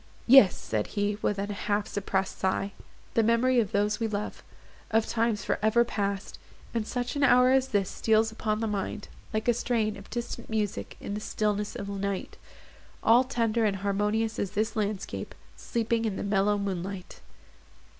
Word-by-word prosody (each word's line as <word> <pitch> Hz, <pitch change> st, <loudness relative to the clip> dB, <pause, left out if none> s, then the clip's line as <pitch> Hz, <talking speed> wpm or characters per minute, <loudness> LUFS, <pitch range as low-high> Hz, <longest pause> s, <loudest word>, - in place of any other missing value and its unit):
"Yes," 245 Hz, -6 st, +8 dB
said 110 Hz, -1 st, -2 dB
he, 205 Hz, 0 st, 0 dB
with 205 Hz, -, 0 dB
a 200 Hz, -, -1 dB
half 205 Hz, 0 st, -1 dB
suppressed 195 Hz, -1 st, -2 dB
sigh, 190 Hz, +1 st, 0 dB, 0.4 s
"the 230 Hz, -, +4 dB
memory 230 Hz, +3 st, +3 dB
of 215 Hz, -5 st, 0 dB
those 205 Hz, +2 st, +1 dB
we 225 Hz, -, 0 dB
love—of 215 Hz, +1 st, -4 dB
times 230 Hz, -2 st, 0 dB
for -, -, 0 dB
ever 225 Hz, +3 st, +4 dB
past! 200 Hz, -3 st, -3 dB, 0.3 s
in 230 Hz, -2 st, -1 dB
such 245 Hz, +3 st, -3 dB
an 285 Hz, -, -1 dB
hour 255 Hz, -2 st, +6 dB
as 265 Hz, 0 st, +3 dB
this 200 Hz, -6 st, +1 dB
steals 220 Hz, 0 st, +2 dB
upon 215 Hz, -1 st, -2 dB
the 225 Hz, -, 0 dB
mind, 205 Hz, 0 st, -3 dB, 0.2 s
like 220 Hz, +1 st, -2 dB
a 240 Hz, -, +5 dB
strain 225 Hz, -2 st, 0 dB
of 200 Hz, -, -13 dB
distant 240 Hz, 0 st, -5 dB
music 215 Hz, -2 st, -2 dB
in 200 Hz, -, -5 dB
the 210 Hz, -, -2 dB
stillness 210 Hz, -1 st, -1 dB
of 200 Hz, -, -5 dB
night;—all 200 Hz, +4 st, -1 dB
tender 230 Hz, -3 st, 0 dB
and 205 Hz, -2 st, +2 dB
harmonious 210 Hz, +3 st, 0 dB
as 195 Hz, -, -2 dB
this 220 Hz, +2 st, -1 dB
landscape, 210 Hz, -2 st, -3 dB, 0.2 s
sleeping 230 Hz, 0 st, -1 dB
in 210 Hz, -3 st, -1 dB
the -, -, -4 dB
mellow 200 Hz, 0 st, +2 dB
moonlight." 195 Hz, -1 st, -4 dB
215 Hz, 165 wpm, -28 LUFS, 200-230 Hz, 0.4 s, Yes